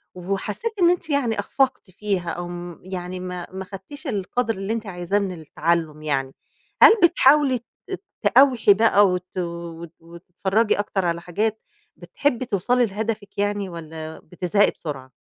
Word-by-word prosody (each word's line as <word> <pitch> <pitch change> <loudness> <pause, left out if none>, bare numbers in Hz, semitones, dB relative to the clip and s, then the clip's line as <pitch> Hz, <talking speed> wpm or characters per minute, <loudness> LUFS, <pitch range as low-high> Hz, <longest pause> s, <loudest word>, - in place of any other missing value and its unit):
وحسّيتِ 195 - -3
إن 345 - +7
أنت 350 -2 0
يعني 250 -7 +1
أخفقتِ 255 -1 0
فيها 190 -2 -2
أو 175 +1 -4
آمم، 175 -1 -7
يعني 185 0 -5
ما 180 -1 -5
ما 190 0 -6
خدتيش 205 - -9
القدْر 225 +1 -1
اللي 195 +3 -3
أنتِ 230 -1 -4
عايزاه 180 +1 -1
من 200 -2 -2
التعلُّم 160 0 -1
يعني، 135 -3 -1 0.5
هل - - +11
بتحاولي 290 -5 +5
ت - - -35 0.6
تقاوحي 255 -6 +5
بقى 205 -1 +5
وت 180 0 -3
و 170 -1 -5
و 170 +1 -13
تتفرّجي 195 +5 0
أكتر 195 -2 -1
على 170 0 -1
حاجات، 210 +6 -2 0.3
بتحبّي 255 -3 -1
توصَلي 240 +4 +2
لهدفِك 210 0 -4
يعني 205 -1 -1
والّا 160 -2 -8
بتزهقي 180 +4 +1
بسرعة؟ 135 -5 -7
195 Hz, 150 wpm, -23 LUFS, 175-225 Hz, 0.6 s, هل